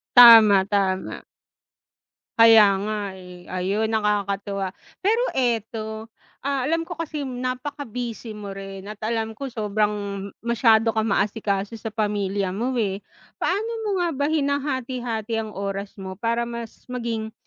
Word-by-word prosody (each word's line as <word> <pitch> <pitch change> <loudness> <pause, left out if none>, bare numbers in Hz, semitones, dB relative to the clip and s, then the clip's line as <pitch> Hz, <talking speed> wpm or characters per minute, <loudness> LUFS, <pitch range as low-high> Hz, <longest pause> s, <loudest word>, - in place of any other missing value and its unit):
Tama, 225 -5 +10
tama. 195 -2 -1 1.2
Kaya 225 -2 +9
nga 210 +1 -2 0.2
eh, 180 -1 -12
ayun 195 +4 0
nakakatuwa. 200 -2 -1 0.3
Pero 450 +4 +3
eto, 225 -3 -2 0.3
ah, 275 -1 -1
alam 330 +4 0
ko 350 - -5
kasi 305 -3 -4
napaka-busy 250 -2 -4
mo 205 -2 -7
rin 195 0 -8
at 210 0 -7
alam 225 0 -2
ko 275 +1 -6
sobrang, 210 -2 0 0.5
masyado 225 -1 +3
kang 220 0 +1
ma-asikaso 200 +1 0
sa 225 0 -6
pamilya 205 -3 -1
mo 240 +5 -1
eh. 200 -2 -1 0.3
Paano 420 +5 -1
mo - - -1
nga 345 - +1
ba 285 +1 0
hinahati-hati 260 -6 -1
ang 215 - -8
oras 200 0 -4
mo 190 -1 -6
para 235 +3 -1
mas 235 -1 -8
maging, 230 -3 -3
220 Hz, 130 wpm, -24 LUFS, 200-245 Hz, 1.2 s, Tama